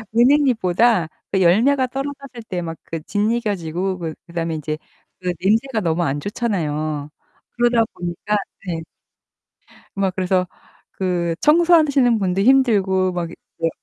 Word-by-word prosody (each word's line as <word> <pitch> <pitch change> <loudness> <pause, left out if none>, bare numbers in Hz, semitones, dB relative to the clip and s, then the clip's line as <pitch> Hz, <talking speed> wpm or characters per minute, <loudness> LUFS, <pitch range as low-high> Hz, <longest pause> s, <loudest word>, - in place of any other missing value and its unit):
은행잎보다 235 - +3 0.2
그 190 - +1
열매가 250 +10 +4
떨어졌을 275 -1 -6
때 180 -1 -3
막 165 -1 -5
그 165 -1 -6
짓이겨지고 195 -5 -1
그 165 -2 -4
그다음에 165 -1 -3
이제 155 0 -3 0.4
그 180 -1 -1
냄새가 225 +4 +1
너무 170 0 0
안 145 -1 -1
좋잖아요. 155 -8 -2 0.4
그러다 240 -1 +3
보니까 180 +4 -2 0.3
네. 170 -2 -3 1.2
막 195 -2 0
그래서 185 -1 +1 0.5
그 175 -3 -1
청소하시는 300 -7 +4
분도 190 -1 0
힘들고 200 -8 +3
막 175 -2 -3
이제 165 -1 -5
190 Hz, 280 characters per minute, -21 LUFS, 170-240 Hz, 1.2 s, 열매가